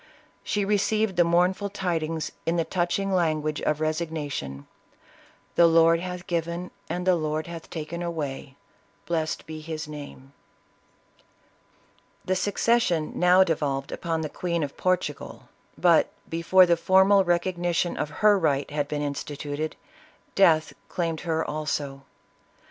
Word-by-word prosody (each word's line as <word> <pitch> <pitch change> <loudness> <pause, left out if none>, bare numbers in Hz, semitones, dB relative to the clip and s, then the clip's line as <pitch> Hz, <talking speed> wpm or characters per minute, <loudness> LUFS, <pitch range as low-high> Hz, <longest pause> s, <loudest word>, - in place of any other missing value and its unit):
She 205 -1 -1
received 210 0 +1
the 175 - +5
mournful 180 +4 +2
tidings 165 -5 -2 0.2
in 165 - +2
the 165 -1 +1
touching 185 +3 -1
language 155 -4 0
of 150 0 0
resignation, 155 - -3 0.5
" - - -29
The 170 - +7
Lord 165 0 +5
hath 180 0 -6
given, 170 +1 -3 0.2
and 180 0 -3
the 185 - +5
Lord 155 -1 -2
hath 170 -1 -9
taken 165 +1 -5
away, 145 -5 -4 0.5
blessed 160 -2 -2
be 155 0 -7
his 155 -1 -5
name 145 -2 -10 0.9
!" - - -36
The 185 - +1
succession 200 -3 +1
now 180 +1 +6
devolved 145 -5 -2
upon 165 -1 -2
the 155 - -2
Queen 170 -1 -2
of 140 - -5
Portugal, 180 -5 -2 0.3
but - - +4 0.2
before 175 +3 +4
the 170 -1 +3
formal 190 +3 +5
recognition 175 0 0
of 150 - -2 0.2
her 205 -2 +6
right 145 -4 0
had 145 -1 -1
been 150 0 -2
instituted, 145 +1 -4 0.6
death 160 -5 +4 0.2
claimed 165 -3 -2
her 160 -2 -1
also. 145 -2 -3
165 Hz, 135 wpm, -26 LUFS, 155-180 Hz, 0.9 s, The